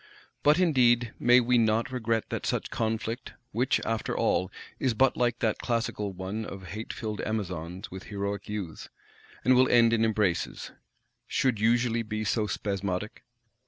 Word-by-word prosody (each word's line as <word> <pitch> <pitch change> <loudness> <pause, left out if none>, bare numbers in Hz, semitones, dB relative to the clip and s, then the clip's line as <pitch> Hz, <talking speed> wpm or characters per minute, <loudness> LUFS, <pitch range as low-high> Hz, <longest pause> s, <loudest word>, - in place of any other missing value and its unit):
But 150 +2 +5
indeed 120 -9 +3
may 125 +1 +6
we 125 0 +3
not 115 +2 +2
regret 115 -3 -1
that - - -3
such - - -2
conflict,—which, 115 +2 -2
after 115 -1 -2
all, 90 - +1 0.3
is 125 -4 +1
but 130 +3 +3
like 120 -1 +1
that 110 -2 +1
classical 115 -4 -1
one 95 +4 -4
of 95 -4 -8
"hate 110 +4 -5
filled 110 -2 -4
Amazons 90 -3 -4
with 95 0 -8
heroic 100 -1 -4
Youths," 100 -6 -5 0.6
and 130 - +6
will 130 +1 +5
end 115 -1 +5
in 115 -1 +3
embraces,—should 110 +3 -2
usually 115 +1 +2
be 110 -1 -3
so 110 0 0
spasmodic? 100 0 -3
110 Hz, 145 wpm, -28 LUFS, 100-120 Hz, 0.6 s, may